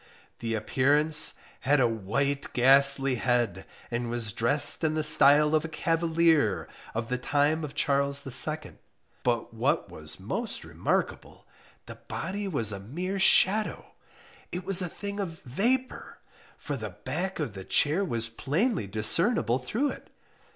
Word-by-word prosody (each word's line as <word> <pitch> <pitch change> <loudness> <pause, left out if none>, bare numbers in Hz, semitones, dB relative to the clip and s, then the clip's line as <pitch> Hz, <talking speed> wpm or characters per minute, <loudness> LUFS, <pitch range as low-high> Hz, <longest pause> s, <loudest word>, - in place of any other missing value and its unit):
The 115 -1 -3
appearance 150 +7 +3 0.2
had 145 +2 +1
a 125 - +3
white 120 +6 -3
ghastly 135 +1 +5
head, 120 -7 -1 0.2
and 120 0 -3
was 115 -3 -1
dressed 145 - +3
in 155 -1 0
the 155 - -1
style 150 +1 +5
of 155 -1 +2
a - - -4
cavalier 165 - 0 0.3
of 115 0 -4
the 125 0 -2
time 150 +4 0
of 150 -1 -7
Charles 140 0 0
II; 150 +4 +1 0.5
but 120 -2 -2
what 135 +8 -1
was 75 0 -6
most - - -3
remarkable, - - -4 0.4
the - - -12
body 200 +4 -5
was 115 - 0
a 100 - -6
mere 180 - -5
shadow, 210 +2 +3 0.6
it 180 0 -6
was 195 -1 +2
a 180 - -3
thing 200 +4 -7
of 170 -5 -6
vapour, 245 - -2 0.4
for 145 - -6
the 110 -5 -6
back 170 - -5
of 145 -9 -4
the 95 -1 -9
chair 155 - +1
was 115 -10 -2
plainly 145 - -2
discernible 115 - +2
through 240 - -2
it. - - -12
140 Hz, 145 wpm, -27 LUFS, 120-165 Hz, 0.6 s, ghastly